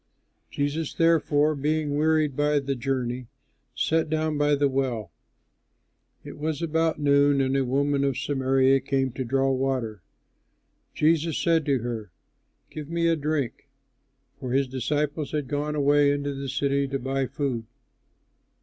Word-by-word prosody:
Jesus, 145 +2 -2
therefore, 155 -2 +3
being 150 0 -1
wearied 155 -2 +2
by 150 +1 +2
the 140 -1 -1
journey, 125 -1 -3 0.5
sat 160 -1 +1
down 155 0 0
by 145 0 +2
the 145 0 +2
well. 130 -5 -2 1.1
It - - -10
was 155 -1 -2
about 160 -1 0
noon 140 -1 +4
and 135 0 +1
a 135 - +2
woman 140 +2 +1
of 135 -2 0
Samaria 135 -1 +2
came 135 0 -1
to 130 - -4
draw 135 +2 +1
water. 130 -6 -2 0.9
Jesus 160 0 +2
said 165 -3 +1
to 135 -5 +1
her, 115 -4 -4 0.6
"Give 150 -1 -7
me 170 0 0
a 165 - +3
drink." 145 -4 -3 0.7
(For 130 -3 -4
his 135 0 +2
disciples 145 +4 -2
had 150 -3 -2
gone 150 +2 -2
away 145 0 +4
into 145 0 -2
the 135 0 -5
city 140 +1 0
to 135 0 -2
buy 135 0 -2
food.) 125 -6 -3
140 Hz, 145 wpm, -25 LUFS, 135-150 Hz, 1.1 s, noon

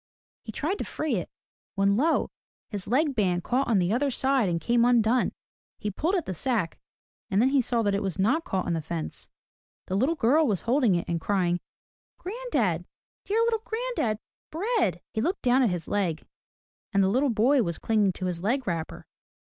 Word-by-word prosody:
He 220 - -8
tried 335 - -2
to - - -1
free 300 -8 -2
it, 175 - -4 0.5
when 200 0 +3
lo! 310 +9 +1 0.4
his 205 -4 -4
leg 280 +5 +2
band 180 -6 +1
caught 260 +3 0
on 225 - +3
the 180 +2 +2
other 275 +4 +1
side 265 -4 +1
and 170 -1 0
came 235 +7 +2
undone. 240 0 +3 0.5
He 210 - -3
pulled 325 - 0
at 350 - -1
the 185 - -3
sack, 205 -2 -1 0.5
and 195 - +2
then 250 +4 +4
he 275 -1 +3
saw 235 -1 0
that 205 -1 +1
it 200 - 0
was 195 -3 -2
not 225 +12 +2
caught 190 - -2
on 175 - -1
the 165 - -1
fence,— 160 +1 -5 0.6
the - - -5
little 265 +11 +2
girl 295 +4 +3
was 200 -6 0
holding 240 -5 +2
it 170 - -2
and 170 -1 -2
crying, 180 -3 +1 0.6
Granddad, 485 +6 -2 0.4
dear 435 +3 +1
little 460 -1 +1
granddaddy, 445 - -2 0.3
bread!'* 340 - 0
He 220 - -1
looked 360 - -1
down 255 +1 +4
at 245 - +3
his 175 -3 -3
leg, 185 -6 -1 0.7
and 200 -2 +3
the - - +3
little 260 +8 +2
boy 245 +5 +3
was 170 -6 -2
clinging 215 -3 +2
to 185 - -5
his 175 -2 -3
leg 250 +7 0
wrapper. 165 -5 -4
225 Hz, 200 wpm, -27 LUFS, 190-275 Hz, 0.7 s, then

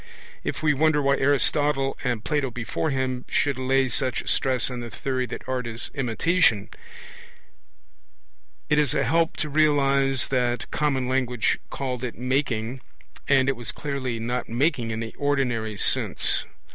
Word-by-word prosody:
If - - -4
we 150 -1 +4
wonder 155 +1 +3
why 140 -1 +2
Aristotle, 140 0 +2
and 120 -4 -1
Plato 145 -4 0
before 120 +6 -3
him, 130 -2 -1
should 140 -2 +1
lay 130 +1 +2
such 130 -1 0
stress 130 -1 +1
on 125 - -4
the 120 -1 -6
theory 130 +1 -2
that - - -8
art 125 -1 -2
is 115 0 -5
imitation, 130 - +2 2.0
it 150 - +3
is 145 -5 +2
a - - +2
help 165 +5 +1
to 155 - -1
realize 140 -3 +2
that 125 -2 0
common 135 -4 0
language 125 -2 +1
called 130 -2 -4
it 125 - -4
'making', 125 -1 -1 0.5
and 135 -1 +4
it 135 - +2
was 120 0 -5
clearly 135 -5 -3
not 120 +2 -3
'making' 125 0 +1
in 110 0 -3
the 115 -1 -5
ordinary 125 -7 0
sense. - - +1
130 Hz, 150 wpm, -25 LUFS, 120-145 Hz, 2.0 s, we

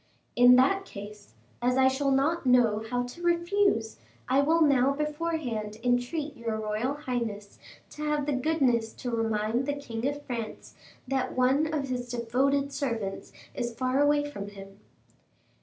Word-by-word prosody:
"In 245 +1 +7
that 280 +10 +3
case, 205 - -11 0.3
as 250 +1 +1
I 260 0 +5
shall 270 +1 +1
not 280 +6 +1
know 240 -4 +3
how 245 +1 0
to 245 +8 -9
refuse, 345 - +1 0.3
I 265 +2 +3
will 325 +4 +2
now 275 -2 +4
beforehand 300 -8 -3
entreat 250 +5 0
your 230 -2 -3
royal 215 +6 -2
highness 235 -8 -4 0.3
to 300 - -7
have 295 -1 0
the 295 - 0
goodness 255 -5 +1
to 245 - -5
remind 225 +2 0
the 285 - 0
king 240 -4 -4
of 290 0 -4
France 235 -5 -6 0.3
that 260 -1 -2
one 270 +5 +3
of 285 -4 -2
his 245 -1 -3
devoted 265 +4 0
servants 230 -8 -3 0.2
is 240 -2 -4
far 255 +2 +1
away 290 0 +3
from 200 -9 -7
him." 195 0 -12
255 Hz, 155 wpm, -28 LUFS, 230-290 Hz, 0.3 s, In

